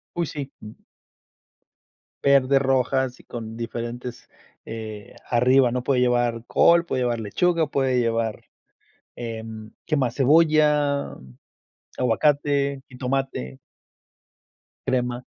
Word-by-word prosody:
Uy, 170 Hz, -, 0 dB
sí. 145 Hz, -2 st, -6 dB
Mm. 105 Hz, -, -9 dB, 1.5 s
Verde, 140 Hz, 0 st, +4 dB
rojas 130 Hz, -1 st, +1 dB
y -, -, -18 dB
con 115 Hz, -1 st, -7 dB
diferentes 120 Hz, +1 st, -6 dB, 0.3 s
eh, 110 Hz, -2 st, -8 dB, 0.2 s
arriba, 125 Hz, +1 st, +4 dB
¿no? 125 Hz, -1 st, -2 dB
Puede 130 Hz, -2 st, +1 dB
llevar 120 Hz, -2 st, +1 dB
col, 170 Hz, 0 st, +4 dB
puede 130 Hz, -6 st, -2 dB
llevar 120 Hz, -1 st, 0 dB
lechuga, 160 Hz, -, +1 dB
puede 130 Hz, -3 st, +1 dB
llevar, 115 Hz, -2 st, -1 dB, 0.7 s
em, 110 Hz, -2 st, -7 dB
¿qué 155 Hz, -, +1 dB
más? 125 Hz, -3 st, 0 dB
Cebolla, 150 Hz, 0 st, +3 dB, 0.8 s
aguacate, 140 Hz, +2 st, +1 dB
jitomate. 125 Hz, -, -3 dB, 1.3 s
Crema. 125 Hz, -1 st, -1 dB
125 Hz, 100 wpm, -24 LUFS, 115-140 Hz, 1.5 s, Verde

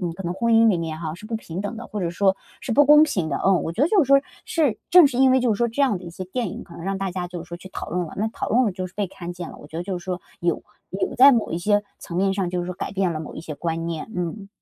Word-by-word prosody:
嗯， 175 Hz, -2 st, -2 dB
可 195 Hz, -, -7 dB
能 175 Hz, -1 st, -2 dB
婚 230 Hz, +5 st, +1 dB
姻 225 Hz, 0 st, +6 dB
里 185 Hz, -6 st, +2 dB
面 160 Hz, -1 st, -4 dB
哈， 160 Hz, -2 st, -4 dB
是 210 Hz, +5 st, -11 dB
不 225 Hz, 0 st, -2 dB
平 180 Hz, -5 st, -6 dB
等 205 Hz, +3 st, -4 dB
的， 235 Hz, +1 st, -7 dB
或 210 Hz, -, -5 dB
者 175 Hz, -, 0 dB
说 190 Hz, +2 st, +2 dB, 0.3 s
是 245 Hz, -, -2 dB
不 290 Hz, +5 st, +6 dB
公 300 Hz, +1 st, +8 dB
平 185 Hz, -, +1 dB
的。 140 Hz, -, -1 dB
嗯， 195 Hz, -2 st, +4 dB
我 -, -, -3 dB
觉 220 Hz, -, 0 dB
得 300 Hz, -, +4 dB
就 390 Hz, -2 st, +4 dB
是 275 Hz, -, -1 dB
说 275 Hz, 0 st, +7 dB, 0.3 s
是 300 Hz, -, +1 dB
正 355 Hz, -4 st, +9 dB
是 250 Hz, -3 st, -2 dB
因 265 Hz, 0 st, +6 dB
为 260 Hz, 0 st, +4 dB
就 245 Hz, -2 st, +2 dB
是 -, -, -7 dB
说 235 Hz, -, +2 dB
这 235 Hz, +5 st, 0 dB
样 245 Hz, -9 st, +2 dB
的 180 Hz, -, -12 dB
一 -, -, -7 dB
些 185 Hz, +2 st, -7 dB
电 220 Hz, +4 st, -3 dB
影 -, -, -8 dB
可 170 Hz, -, -14 dB
能 -, -, -9 dB
让 195 Hz, +1 st, -1 dB
大 195 Hz, 0 st, -2 dB
家 180 Hz, -1 st, -4 dB
就 175 Hz, -2 st, -6 dB
是 -, -, -22 dB
说 170 Hz, -, -6 dB
去 190 Hz, -, -11 dB
讨 -, -, -7 dB
论 175 Hz, 0 st, -1 dB
了， -, -, -10 dB
那 210 Hz, -, 0 dB
讨 -, -, -5 dB
论 250 Hz, +3 st, +3 dB
了 210 Hz, -, 0 dB
就 185 Hz, 0 st, -4 dB
是 180 Hz, -, -15 dB
被 205 Hz, 0 st, -1 dB
看 175 Hz, -2 st, -8 dB
见 175 Hz, -1 st, -6 dB
了， -, -, -12 dB
我 -, -, -12 dB
觉 155 Hz, -, -9 dB
得 170 Hz, -, -2 dB
就 185 Hz, 0 st, -3 dB
是 175 Hz, -, -14 dB
说 180 Hz, -1 st, -3 dB, 0.2 s
有 170 Hz, -2 st, 0 dB, 0.3 s
有 190 Hz, -, -2 dB
在 275 Hz, +3 st, +9 dB
某 230 Hz, -4 st, 0 dB
一 165 Hz, -, -1 dB
些 205 Hz, +3 st, +2 dB, 0.2 s
层 170 Hz, -, -7 dB
面 195 Hz, +1 st, +2 dB
上 195 Hz, -2 st, -1 dB
就 180 Hz, 0 st, -2 dB
是 175 Hz, -, -4 dB
说 180 Hz, -, -4 dB
改 -, -, -5 dB
变 190 Hz, -3 st, 0 dB
了 155 Hz, -, -4 dB
某 155 Hz, -, -8 dB
一 -, -, -6 dB
些 155 Hz, -, -6 dB
观 165 Hz, +2 st, -3 dB
念。 165 Hz, +4 st, -4 dB
嗯。 180 Hz, +3 st, -4 dB
190 Hz, 380 characters per minute, -23 LUFS, 175-225 Hz, 0.3 s, 正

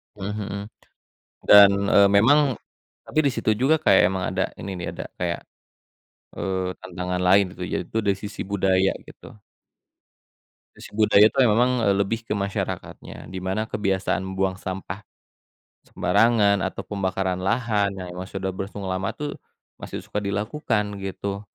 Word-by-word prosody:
Mmm, 100 Hz, 0 st, -5 dB
mhm. 105 Hz, -1 st, -4 dB, 0.9 s
Dan, 100 Hz, -1 st, +9 dB, 0.2 s
eee, 100 Hz, 0 st, +6 dB
memang 130 Hz, +6 st, +4 dB, 0.4 s
tapi 155 Hz, -, -2 dB
di 140 Hz, -, +3 dB
situ -, -, -1 dB
juga 135 Hz, +6 st, +3 dB
kayak 95 Hz, -, +5 dB
emang 95 Hz, -1 st, -2 dB
ada, 95 Hz, 0 st, -2 dB, 0.2 s
ini 100 Hz, -, -5 dB
nih. 90 Hz, -, -5 dB
Ada -, -, -6 dB
kayak, 85 Hz, -1 st, -2 dB, 1.0 s
eee, 95 Hz, -1 st, -1 dB
tantangan 90 Hz, 0 st, -4 dB
lain, 100 Hz, +2 st, +6 dB
gitu, 90 Hz, -, -8 dB
yaitu 90 Hz, +5 st, -3 dB
dari 100 Hz, -3 st, 0 dB
sisi 105 Hz, -, -6 dB
budaya, 95 Hz, -1 st, +2 dB, 0.2 s
gitu. -, -, -14 dB, 1.5 s
Sisi -, -, -12 dB
budaya 105 Hz, -1 st, +6 dB
itu -, -, -12 dB
memang, 120 Hz, +2 st, +2 dB
eee, 100 Hz, -, +4 dB
lebih 115 Hz, +3 st, -2 dB
ke -, -, -2 dB
masyarakatnya, 100 Hz, -1 st, -5 dB
di 95 Hz, -, -7 dB
mana 95 Hz, +4 st, -2 dB
kebiasaan 95 Hz, -2 st, -1 dB
membuang 95 Hz, 0 st, -1 dB
sampah 95 Hz, +1 st, -6 dB, 0.8 s
sembarangan, 100 Hz, 0 st, +3 dB
atau 95 Hz, -, -4 dB
pembakaran 95 Hz, -2 st, -2 dB
lahan, 110 Hz, -1 st, +1 dB
yang 90 Hz, -1 st, -6 dB
emang 90 Hz, +1 st, -7 dB
sudah 95 Hz, -1 st, -4 dB
berlangsung 95 Hz, +1 st, -6 dB
lama 95 Hz, +1 st, -2 dB
tuh, 150 Hz, 0 st, -4 dB, 0.5 s
masih -, -, -6 dB
suka 105 Hz, -, -3 dB
dilakukan, 105 Hz, +1 st, -2 dB
gitu. 100 Hz, +1 st, -4 dB
100 Hz, 145 wpm, -24 LUFS, 95-105 Hz, 1.5 s, Dan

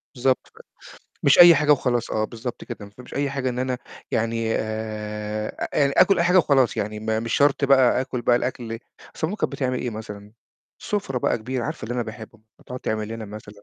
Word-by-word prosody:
بالضبط، 130 Hz, +1 st, +1 dB
ف -, -, -21 dB, 0.6 s
مش 140 Hz, -, +5 dB
أي 175 Hz, -1 st, +10 dB
حاجة 150 Hz, 0 st, +4 dB
وخلاص، 125 Hz, -4 st, 0 dB
آه 110 Hz, -, 0 dB
بالضبط 120 Hz, +2 st, -6 dB
كده. 105 Hz, -, -8 dB
ما 100 Hz, -, -13 dB
تفهميش 125 Hz, +4 st, -13 dB
أي 140 Hz, 0 st, 0 dB
حاجة 135 Hz, -2 st, -2 dB
إن 125 Hz, 0 st, -3 dB
أنا 130 Hz, 0 st, -1 dB, 0.3 s
يعني 115 Hz, 0 st, 0 dB
آآ 110 Hz, -1 st, -4 dB
أ 140 Hz, -1 st, +1 dB
آكُل 195 Hz, -2 st, +5 dB
أي 170 Hz, -, +3 dB
حاجة 180 Hz, +1 st, +5 dB
وخلاص، 135 Hz, -7 st, +3 dB
يعني 105 Hz, +1 st, -3 dB
م 110 Hz, -, -9 dB, 0.2 s
مش 115 Hz, 0 st, -2 dB
شرط 145 Hz, 0 st, +3 dB
بقى 130 Hz, -2 st, +5 dB
آكُل 130 Hz, -2 st, -4 dB
بقى 120 Hz, -, +4 dB
الأكل 120 Hz, -2 st, -3 dB, 0.4 s
أصل 160 Hz, -, -1 dB
ماما 195 Hz, +6 st, -4 dB
كانت -, -, -1 dB
بتعمل 130 Hz, -2 st, -1 dB
إيه 125 Hz, -, -3 dB
مثلًا؟ 105 Hz, -2 st, -9 dB, 0.5 s
سُفرة 200 Hz, -, -2 dB
بقى -, -, 0 dB
كبيرة، 125 Hz, +2 st, -3 dB
عارفة -, -, -5 dB
اللي 120 Hz, +3 st, -4 dB
أنا 125 Hz, -, 0 dB
باحبه، 110 Hz, -1 st, -10 dB, 0.2 s
هتقعد 125 Hz, 0 st, -8 dB
تعمل 110 Hz, -1 st, -2 dB
لنا 115 Hz, 0 st, -6 dB
مثلًا 105 Hz, 0 st, -11 dB
120 Hz, 205 wpm, -23 LUFS, 110-135 Hz, 0.6 s, أي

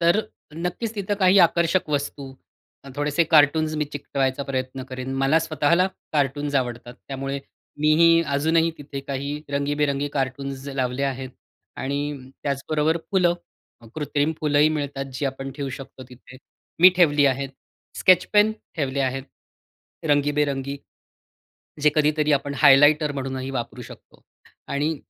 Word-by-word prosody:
तर 170 Hz, +5 st, +4 dB, 0.3 s
नक्कीच 180 Hz, +7 st, -4 dB
तिथं 205 Hz, -1 st, -2 dB
काही 190 Hz, +1 st, +5 dB
आकर्षक 170 Hz, 0 st, +3 dB
वस्तू 140 Hz, -1 st, -3 dB, 0.5 s
अ, -, -, -10 dB
थोडेसे 150 Hz, +3 st, +1 dB
कार्टून्स 155 Hz, +1 st, +4 dB
मी 150 Hz, -, 0 dB
चिकटवायचा 140 Hz, -2 st, -2 dB
प्रयत्न 130 Hz, -1 st, -4 dB
करीन. 130 Hz, 0 st, -6 dB
मला 135 Hz, +4 st, +3 dB
स्वतःला 165 Hz, +2 st, +2 dB, 0.3 s
कार्टून्स 145 Hz, 0 st, 0 dB
आवडतात. 120 Hz, -2 st, -2 dB
त्यामुळे 135 Hz, 0 st, -4 dB, 0.4 s
मीही 165 Hz, +2 st, +5 dB
अजूनही 160 Hz, +4 st, +2 dB
तिथे 140 Hz, -1 st, -7 dB
काही 140 Hz, +2 st, -4 dB
रंगीबेरंगी 145 Hz, 0 st, 0 dB
कार्टून्स 135 Hz, 0 st, -3 dB
लावले 130 Hz, -1 st, -2 dB
आहेत. 130 Hz, -1 st, -3 dB, 0.5 s
आणि 140 Hz, -1 st, -4 dB
त्याचबरोबर 150 Hz, +3 st, 0 dB
फुलं, 180 Hz, -3 st, +3 dB, 0.6 s
कृत्रिम 150 Hz, 0 st, -1 dB
फुलंही 150 Hz, 0 st, +3 dB
मिळतात 140 Hz, -3 st, -3 dB
जी 140 Hz, -, -3 dB
आपण 135 Hz, 0 st, -5 dB
ठेवू 140 Hz, -1 st, -5 dB
शकतो 135 Hz, -1 st, -11 dB
तिथे. 130 Hz, 0 st, -15 dB, 0.4 s
मी 185 Hz, -, +10 dB
ठेवली 145 Hz, -5 st, +4 dB
आहे. 135 Hz, 0 st, 0 dB, 0.5 s
स्केच 185 Hz, -1 st, +5 dB
पेन 210 Hz, +1 st, +5 dB, 0.2 s
ठेवले 140 Hz, -3 st, -1 dB
आहेत. 135 Hz, 0 st, -1 dB, 0.9 s
रंगीबेरंगी 145 Hz, -1 st, +1 dB, 1.1 s
जे 150 Hz, -, +5 dB
कधीतरी 150 Hz, 0 st, +2 dB
आपण 140 Hz, 0 st, -1 dB
हायलाइटर 145 Hz, +2 st, +6 dB
म्हणूनही 135 Hz, -1 st, -4 dB
वापरू 125 Hz, -1 st, -5 dB
शकतो. -, -, -14 dB, 0.5 s
आणि, 150 Hz, +3 st, -1 dB
145 Hz, 125 wpm, -23 LUFS, 135-155 Hz, 1.1 s, मी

